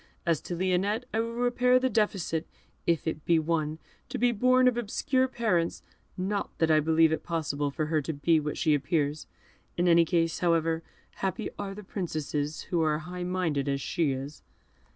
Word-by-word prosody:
As 165 -3 +1
to 175 - -5
Lionette, 190 +6 0
I 220 - +1
will 230 +1 -2
repair 245 +1 +3
the 255 +1 +2
defect, 195 -9 0 0.4
if 170 -3 +1
it 155 -2 -3
be 170 - +3
one, 155 -1 0 0.3
to - - -3
be 245 +1 +3
born 255 +3 +4
of 250 - +3
obscure 255 +3 0
parents, 210 -10 0 0.3
not 195 +2 -1
that 160 -1 +2
I 155 - +5
believe 160 +1 +4
it 160 - -1
possible 150 -3 -2
for 155 +2 -2
her 155 0 +1
to 155 +3 -4
be 155 +3 +2
what 150 0 -3
she 160 -4 +2
appears. 145 +1 0 0.5
In 175 +1 +2
any 170 -1 +6
case, 165 -1 0
however, 165 -2 +1 0.4
happy 195 +3 -2
are 195 -1 -4
the 210 - -9
princesses 155 -6 -3
who 170 -2 +2
are 155 -1 +2
as - - -7
high 180 +2 -6
minded 165 -6 -1
as 140 0 0
she 155 +1 0
is." 135 +3 -6
170 Hz, 190 wpm, -28 LUFS, 155-200 Hz, 0.5 s, any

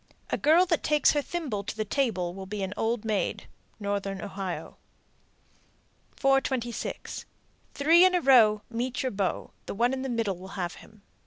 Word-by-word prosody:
A - - +2
girl 330 +5 +5
that 335 -3 +1
takes 300 0 +4
her 295 - +1
thimble 280 -11 -3
to 210 - -6
the 215 - -1
table 195 -8 0
will 190 0 -8
be 205 0 -4
an 190 0 -3
old 225 0 -1
maid. 215 -2 -1 0.3
Northern 200 -1 -2
Ohio. 195 -3 -5 1.4
426. 270 -3 -1 0.5
Three 325 +5 +6
in 370 0 +5
a 355 - +2
row, 220 -7 +5
Meet 245 +2 -3
your 260 - -1
beau. 195 -2 -2 0.2
The - - -4
one 240 +4 +2
in 265 - -2
the 265 - -3
middle 225 -6 -1
will 190 +2 -10
have 175 -2 -2
him. 215 -2 -18
225 Hz, 170 wpm, -28 LUFS, 200-270 Hz, 1.4 s, Three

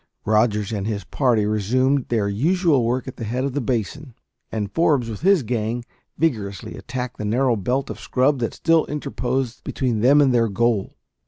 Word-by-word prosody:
Rogers 105 -1 +2
and 100 -1 -2
his 105 -2 -3
party 120 -6 +1
resumed 125 +6 +1
their 110 -4 0
usual 150 - +2
work 125 +3 -1
at 130 - -7
the 115 - -5
head 120 +4 -2
of 140 -1 -2
the 145 - -1
basin; 125 +3 -3 0.4
and 105 -3 -3
Forbes, 145 -8 +2
with 105 - -7
his 190 -3 +4
gang, 115 +1 -2 0.3
vigorously 105 - -2
attacked 125 -2 -5
the - - -5
narrow 120 +3 +2
belt 125 +7 -1
of - - -8
scrub 135 +2 +1
that 115 - -2
still 165 -1 +2
interposed 130 -4 -3
between 125 -5 -1
them 135 +6 +5
and 135 -3 +4
their 115 -1 +3
goal. 110 0 0
120 Hz, 180 wpm, -22 LUFS, 110-135 Hz, 0.4 s, them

